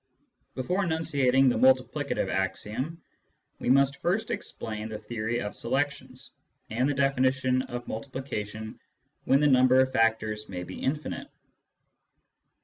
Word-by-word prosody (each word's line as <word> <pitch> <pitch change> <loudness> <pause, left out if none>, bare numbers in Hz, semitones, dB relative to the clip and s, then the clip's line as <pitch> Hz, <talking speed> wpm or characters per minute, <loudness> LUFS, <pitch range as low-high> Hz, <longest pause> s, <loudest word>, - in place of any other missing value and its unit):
Before 180 +10 0
enunciating 145 -6 +2
the 125 - +2
multiplicative 130 -1 +2
axiom, 105 - -2 0.6
we - - -2
must 140 +1 +3
first 220 +6 0
explain 110 - -5
the 110 - -5
theory 115 +1 -3
of 105 - -5
selections, - - -3 0.4
and 125 +5 +1
the - - +1
definition 130 -1 +2
of 120 -1 -6
multi 115 +5 -5
plication 110 -5 -5 0.5
when 135 +2 +4
the - - +4
number 130 -2 +5
of 130 0 +2
factors 110 -1 +1
may 90 -2 -5
be 90 +1 -8
infinite. 150 +3 -3
130 Hz, 130 wpm, -28 LUFS, 110-140 Hz, 0.6 s, number